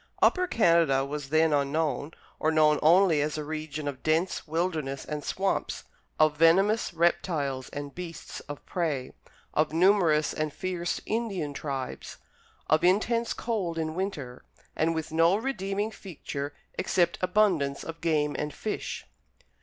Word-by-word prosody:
Upper 365 0 +3
Canada 165 - +3
was 145 0 -5
then 160 +1 +3
unknown, 145 +2 0 0.3
or 155 - +2
known 155 -1 +4
only 165 -1 +5
as 150 +1 -1
a 150 - -3
region 155 -1 -5
of 135 -2 -5
dense 160 +4 0
wilderness 155 -4 -2
and 150 -1 -4
swamps; 195 +6 -1 0.4
of 155 -1 +4
venomous 195 +7 +4
reptiles 165 -6 0
and 145 -1 -6
beasts 170 -3 -7
of 145 - -7
prey; 150 -8 -2 0.4
of 155 0 +1
numerous 170 -4 +4
and 155 -1 -2
fierce 180 +1 -3
Indian 200 -10 -2
tribes; 135 -2 -5 0.5
of 155 +1 +3
intense 225 +6 +2
cold 195 -8 -2
in 160 -1 -2
winter; 155 -9 -4 0.3
and 165 +1 +1
with 160 0 -4
no 165 +3 +4
redeeming 210 -3 -2
feature 145 -8 -6 0.3
except 175 -2 +1
abundance 180 -8 +2
of 165 0 -8
game 150 -3 +1
and 150 -1 -3
fish. 215 - -4
160 Hz, 140 wpm, -28 LUFS, 150-185 Hz, 0.5 s, only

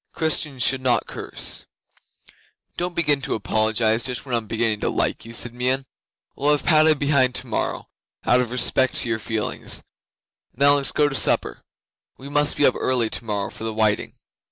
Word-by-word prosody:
Christians 150 -5 -1
should 135 0 +3
not 125 -2 +1
curse. - - -4 1.1
'"Don't 175 0 -3
begin 150 -4 +2
to 140 - -2
apologise 110 +1 +1
Just 125 0 -3
when 130 - -6
I - - +3
am 110 - -12
beginning 110 -1 0
to - - -1
like - - -1
you," 115 - -10
said 120 0 -2
Meon. 130 +2 0 0.5
"We'll 145 +2 0
leave 145 - -1
Padda 155 -1 +5
behind 140 -3 +2
tomorrow 125 -3 -3 0.4
out 125 +1 +4
of 125 - -3
respect 125 +1 +2
to 120 - +1
your 110 -1 0
feelings. 110 -1 -3 0.7
Now 140 +1 +5
let's 140 -1 +1
go 150 - +2
to 145 - -4
supper. - - +1 0.6
We 135 +2 -10
must 145 0 +1
be 145 - +4
up 130 - +5
early 120 -4 +1
tomorrow 105 -4 -3
for - - -9
the 110 -1 -3
whiting." 110 -2 0
125 Hz, 180 wpm, -22 LUFS, 115-140 Hz, 1.1 s, Padda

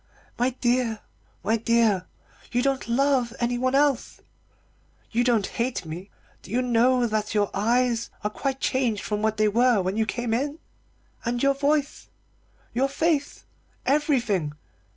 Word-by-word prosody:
My 245 +1 +3
dear, 240 -3 0 0.4
my 220 +4 +2
dear, 225 -5 +2 0.4
you 245 0 +1
don't 275 -2 0
love 250 -1 +1
anyone 245 +2 0
else; 280 -3 +1 0.9
you 235 +1 +2
don't 235 -5 +2
hate 240 -5 -2
me. 170 +5 -7 0.3
Do - - -14
you 245 +5 0
know 245 +1 +3
that 215 -1 -2
your 205 -1 +2
eyes 235 +2 +1
are 210 - -1
quite 270 +3 -3
changed 245 -7 0
from 210 0 -2
what 220 0 0
they 215 0 +3
were 240 +1 +3
when 190 +3 -2
you 220 -1 +1
came 240 -1 -2
in? 285 +6 -1 0.7
And 240 +2 -1
your 275 0 +4
voice, 285 +1 -1 0.6
and - - -11
your 270 +2 +2
face 295 0 -1 0.4
everything. 245 - +1
240 Hz, 150 wpm, -25 LUFS, 220-260 Hz, 0.9 s, your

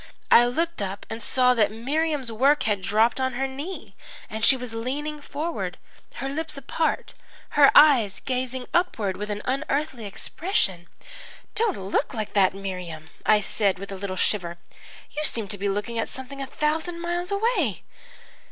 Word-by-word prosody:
I 240 +1 +8
looked 330 +3 -1
up 195 +1 -4
and 225 +1 -5
saw 250 +3 +3
that 215 -4 +3
Miriam's 275 +3 -1
work 275 +6 +3
had 205 -3 +1
dropped 220 +6 +2
on 260 0 0
her 270 +2 -1
knee 285 +8 -7 0.4
and 220 0 -4
she 265 - +6
was 250 -2 -6
leaning 290 +6 -3
forward, 310 +4 -4 0.4
her 270 - -3
lips 305 +1 -3
apart, 275 +4 -1 0.4
her 285 -1 +7
eyes 245 -10 +6
gazing 255 -1 -2
upward 225 - +1
with 210 +1 -5
an 210 0 -3
unearthly 270 -2 -1
expression. 195 - -1 0.7
"'Don't 445 -4 +1
look 195 +8 -1
like 215 -2 -4
that, 195 -2 +4
Miriam!' 180 -5 -6 0.2
I 210 -1 +6
said, 200 -2 +1
with 200 +1 -8
a - - -4
little 190 0 -4
shiver. 175 -3 -1 0.5
'You 300 - -3
seem 230 -8 +1
to 205 - -3
be 200 0 0
looking 210 +4 -2
at - - -1
something 265 +1 -7
a 270 - -4
thousand 315 +5 -1
miles 345 +1 -2
away!' 400 - 0
250 Hz, 165 wpm, -25 LUFS, 205-300 Hz, 0.7 s, I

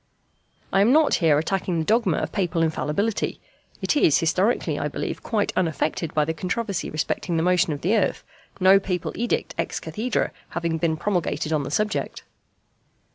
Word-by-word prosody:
I 195 - +4
am 215 +5 +5
not 310 +1 +4
here 155 -3 +4
attacking 180 +2 -1
the 160 - -1
dogma 225 +4 +2
of - - -2
Papal 175 -4 0
Infallibility: 165 +7 -1 0.4
it - - +1
is 160 - +4
historically, 185 +8 +1
I - - -1
believe, - - -4
quite 215 -3 -1
unaffected 165 -2 -1
by 150 -1 +3
the 160 - -1
controversy 190 +5 -3
respecting 165 +2 -2
the 160 - +1
motion 180 0 +3
of 145 - -4
the 195 +7 +2
earth, 210 - 0 0.4
no 190 +1 +6
Papal 180 -3 -3
edict 240 +1 -1
ex - - -2
cathedrâ 235 +4 -2 0.3
having 165 -1 -1
been 160 -1 0
promulgated 175 -3 -1
on 150 - +1
the 140 - -5
subject. 210 +7 -2
180 Hz, 170 wpm, -24 LUFS, 160-210 Hz, 0.4 s, no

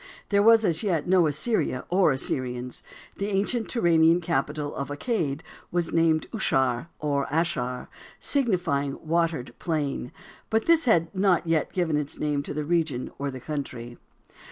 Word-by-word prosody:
There 200 0 +4
was 225 +1 +6
as 165 -3 +1
yet 175 -8 0
no 180 -2 +4
Assyria 150 - -1
or 185 0 +4
Assyrians. 125 -2 -2 0.4
The 200 - -2
ancient 210 +4 0
Turanian 170 -6 +4
capital 150 -3 -2
of 140 - -4
Accad 145 - -2 0.3
was 175 -1 -1
named 165 -1 +3
Aushar 130 - 0
or 145 -2 -1
Asshar, 140 -6 -1 0.3
signifying 175 - 0
"watered 160 -6 0
plain," 150 -7 -2 0.4
but 220 0 +1
this 330 -2 +4
had 170 -8 +3
not 185 -3 +2
yet 165 -2 +1
given 170 -5 0
its 145 -1 -4
name 150 -1 0
to - - -6
the 150 -1 -2
region 160 -6 0
or 140 0 -2
country. 130 -3 -6
160 Hz, 145 wpm, -26 LUFS, 140-180 Hz, 0.4 s, was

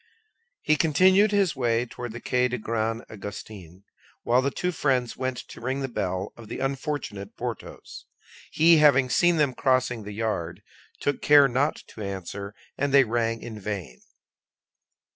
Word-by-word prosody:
He 155 - +3
continued 185 +7 +4
his 200 -5 +2
way 120 -2 +1
toward 120 -1 -7
the 120 - -7
Quai 125 +1 +1
des 125 0 -3
Grands 115 0 -2
Augustins, 100 -3 -9 0.4
while 125 +2 +3
the 140 - 0
two 180 +6 -2
friends 130 -7 0
went 130 -1 -3
to - - -11
ring 130 +3 -2
at - - -4
the - - -1
bell 95 +2 -3
of 115 -2 -12
the - - -6
unfortunate 135 -7 -4
Porthos. 120 -3 -7 0.4
He, 165 +1 +5
having 135 -4 +5
seen 175 +3 +4
them 145 -4 +2
crossing 130 -3 +1
the 105 0 -8
yard, 105 -6 -3 0.4
took 145 - -1
care 145 -1 +7
not 135 +4 -1
to 110 - -11
answer, 100 +1 -6 0.2
and 140 0 0
they 140 0 +7
rang 115 -1 -1
in 110 -2 -7
vain. 95 -10 -6
125 Hz, 160 wpm, -26 LUFS, 110-140 Hz, 0.4 s, care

